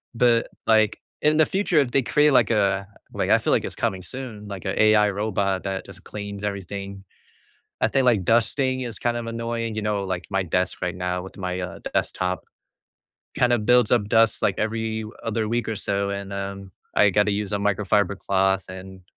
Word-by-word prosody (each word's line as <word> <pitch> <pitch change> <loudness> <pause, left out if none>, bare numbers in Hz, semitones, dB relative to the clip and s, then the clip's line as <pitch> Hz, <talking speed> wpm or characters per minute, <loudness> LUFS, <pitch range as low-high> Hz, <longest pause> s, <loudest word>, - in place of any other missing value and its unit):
but 115 -1 +3 0.2
like 110 -1 +3 0.2
in 155 +1 +3
the 160 - +6
future 190 -3 +1
if 135 -4 +1
they 135 - +3
create 150 +4 +3
like 125 -5 +4
a 100 -3 +1 0.3
like - - -1
I - - +6
feel - - -1
like - - +2
it's - - -5
coming 95 -1 -1
soon, 110 +1 -7
like 100 -3 -7
a - - 0
AI 105 -1 +5
robot 100 -2 -1
that 95 -1 -3
just - - -11
cleans 100 -1 -7
everything. 100 0 -5 0.8
I - - +3
think, 135 - +1
like, 110 -7 +3
dusting 130 +4 +2
is 115 -4 -5
kind 120 0 0
of 115 - -5
annoying, 115 -1 -3
you 110 - -3
know, 105 -1 -1
like 95 -2 -3
my 95 0 +1
desk 90 +1 -1
right 90 -1 -2
now 90 0 -2
with 95 - -10
my, 90 -1 -3
uh, 90 - -6
desktop. 90 0 -1 0.9
Kinda 120 -1 +3
builds 120 +1 +3
up 110 -4 +2
dust 115 0 +3
like - - +1
every 110 0 -2 0.2
other 110 -1 -1
week 120 0 -1
or 110 - -2
so, 100 0 -1
and, 100 0 -5
um, 100 -1 -5 0.2
I 105 - +6
gotta 105 +2 +2
use 105 0 -2
a 105 - +1
microfiber 100 0 +1
cloth 95 0 +1
and 95 0 -10
105 Hz, 195 wpm, -24 LUFS, 95-115 Hz, 0.9 s, the